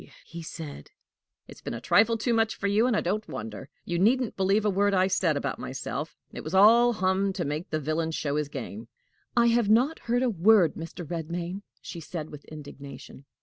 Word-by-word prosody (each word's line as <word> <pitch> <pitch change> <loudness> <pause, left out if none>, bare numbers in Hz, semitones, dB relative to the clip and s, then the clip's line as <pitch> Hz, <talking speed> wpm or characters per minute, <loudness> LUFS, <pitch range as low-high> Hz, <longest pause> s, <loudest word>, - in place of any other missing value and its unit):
he 170 +1 -8
said; 155 - -8 0.6
"it's - - -13
been - - -5
a - - -5
trifle 225 - +3
too 235 +2 0
much 225 -1 +2
for - - -6
you, 210 +4 +3
and 245 - +2
I - - +1
don't 210 +4 -2
wonder! 110 +4 -7 0.2
You 175 -1 -2
needn't 240 +5 +2
believe 195 +2 +2
a - - +4
word 200 +1 +2
I 185 0 +4
said 180 -5 +1
about 140 -2 -3
myself. 140 +3 -5 0.2
It - - -7
was 155 +4 -4
all 235 +5 +7
hum 190 0 +1
to 180 - -3
make 150 +4 -3
the 155 - -1
villain 155 +2 -1
show 150 -3 -2
his 150 -1 -1
game." 215 +8 -7 0.5
"I 235 0 +5
have 230 -3 +2
not 255 +9 +3
heard 240 +2 0
a - - +2
word, 190 -2 +4
Mr. 165 +1 -7
Redmain," 170 +3 -4 0.2
she 170 - -7
said 160 -1 -6
with 150 -1 -11
indignation. 140 -2 -11
185 Hz, 205 wpm, -27 LUFS, 155-215 Hz, 0.6 s, all